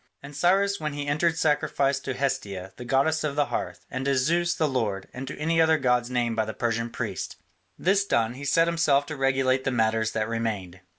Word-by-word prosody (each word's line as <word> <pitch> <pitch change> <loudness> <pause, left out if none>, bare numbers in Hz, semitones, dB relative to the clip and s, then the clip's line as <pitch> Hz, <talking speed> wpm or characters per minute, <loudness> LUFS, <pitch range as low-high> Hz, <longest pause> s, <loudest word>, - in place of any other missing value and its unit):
And 140 +1 -10
Cyrus 195 +6 +2
when 150 -1 -3
he 145 0 -4
entered 160 +3 +1
sacrificed 140 -3 +1
to 130 - -2
Hestia, 105 -9 -3
the 125 - -9
goddess 140 +5 +2
of 145 -2 -2
the 145 -1 +2
Hearth, - - -4
and 130 -1 -3
to 140 -1 +2
Zeus 170 +6 +1
the 155 - +1
Lord, 110 -8 -2
and 130 +2 -6
to - - -6
any 165 +2 +2
other 160 0 +4
gods 125 -3 +1
named 120 -2 0
by 110 -1 +1
the 110 - -6
Persian 115 0 -1
priests. - - -4 0.4
This 195 +3 +2
done, 115 - +1
he 135 +3 -9
set 165 +4 +3
himself 155 -4 +2
to 155 +1 -6
regulate 135 -1 +1
the - - 0
matters 110 -2 +1
that 110 -1 -1
remained. 105 -6 -3
135 Hz, 215 wpm, -26 LUFS, 115-155 Hz, 0.4 s, other